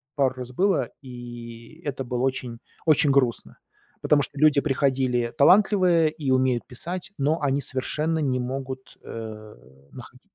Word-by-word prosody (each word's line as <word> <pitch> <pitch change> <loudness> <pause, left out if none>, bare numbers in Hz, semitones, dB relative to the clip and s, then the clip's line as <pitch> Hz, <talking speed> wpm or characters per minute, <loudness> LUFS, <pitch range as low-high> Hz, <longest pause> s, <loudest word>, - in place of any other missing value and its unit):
пару 135 -2 +1
раз 125 -1 -6
было, 190 +3 +1
и 120 +2 -10
это 135 -2 -3
было 125 0 -2
очень 130 -3 -2 0.3
очень 155 -2 +4
грустно, 130 -4 0 0.4
потому 150 -1 +3
что 145 - -5
люди 150 -2 +5
приходили 130 -4 0
талантливые 180 -1 +5
и 150 -4 -3
умеют 130 -2 +2
писать, 170 +8 -3
но 150 +4 0
они 140 -1 +1
совершенно 150 +5 -1
не 130 -4 0
могут, 130 +1 -6
э, 110 -1 -8 0.4
находить - - -12
135 Hz, 140 wpm, -25 LUFS, 125-150 Hz, 0.4 s, люди